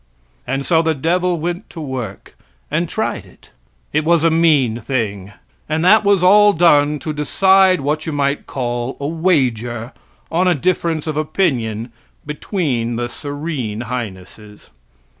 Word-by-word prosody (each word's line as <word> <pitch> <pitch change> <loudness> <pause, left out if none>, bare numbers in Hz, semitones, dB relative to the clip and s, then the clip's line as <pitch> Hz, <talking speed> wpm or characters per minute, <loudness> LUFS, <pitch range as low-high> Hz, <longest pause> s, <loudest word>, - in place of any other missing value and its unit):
And 135 +2 -2
so 165 -2 +3
the 160 -1 0
devil 175 +4 0
went 175 +5 -4
to 165 - -10
work 130 -9 -6 0.4
and - - 0
tried - - -2
it. - - -21 0.4
It 155 - +2
was 165 0 +3
a 165 - +4
mean 150 -8 +3
thing. 105 -5 -3 0.4
And 160 +2 0
that 215 +4 +6
was 200 -3 +3
all 205 +2 +6
done 150 -4 +4
to 155 +1 -5
decide 190 +4 +3
what 150 +3 -2
you - - -1
might 140 -1 -1
call 120 0 -3
a 140 - -4
wager 125 -8 0 0.4
on 180 +3 +2
a 180 - +3
difference 165 0 -1
of 155 -2 -3
opinion 125 - -1 0.3
between 145 - -2
the 120 +1 -3
serene 145 -6 -5
highnesses. 105 -3 -8
150 Hz, 145 wpm, -18 LUFS, 120-170 Hz, 0.4 s, that